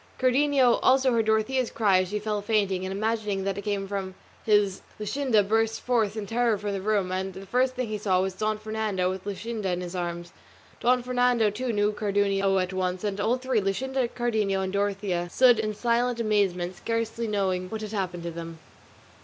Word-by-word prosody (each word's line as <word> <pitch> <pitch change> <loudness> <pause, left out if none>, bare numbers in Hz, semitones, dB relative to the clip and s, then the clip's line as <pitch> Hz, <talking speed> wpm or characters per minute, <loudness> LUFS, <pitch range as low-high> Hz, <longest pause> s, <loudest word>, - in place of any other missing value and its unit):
Cardenio 260 -1 +3
also 260 0 +4
heard 225 -2 +1
Dorothea's 220 +3 +1
cry 200 -4 +3
as 185 - -4
she 210 - -2
fell 210 0 -2
fainting, 200 -3 0
and 190 - -3
imagining 210 -1 -1
that 195 0 -1
it 200 - -4
came 200 -1 -2
from 190 -1 -4 0.3
his 205 -3 +2 0.2
Luscinda 225 0 +1
burst 225 +1 +1
forth 225 -4 0
in 210 - -3
terror 230 0 +1
from 205 0 -4
the 195 -1 -3
room, 200 -2 0
and 190 +1 -2
the 195 - -8
first 255 +5 +1
thing 255 -1 -2
he 215 -1 -3
saw 190 -3 +2
was 190 0 -1
Don 215 +2 -1
Fernando 215 -4 -1
with 190 0 -7
Luscinda 210 +1 -4
in 180 0 -2
his 180 0 -6
arms. 175 -1 -4 0.5
Don 250 0 +2
Fernando, 245 -3 +2
too, 245 +4 -3
knew 205 -1 +2
Cardenio 200 -2 +1
at 185 0 -1
once; 185 0 -2
and 205 -1 -2
all 230 +4 +2
three, 255 -3 0
Luscinda, 255 +6 -1
Cardenio, 220 -5 0
and 190 0 -3
Dorothea, 200 -3 -1
stood 245 +3 +5
in 215 -1 -2
silent 240 +1 +1
amazement 195 -5 0
scarcely 230 +3 -2
knowing 190 -3 -1
what 220 +1 -5
had 215 -1 -6
happened 185 -5 -3
to 170 - -4
them. 165 0 -7
210 Hz, 195 wpm, -26 LUFS, 190-230 Hz, 0.5 s, stood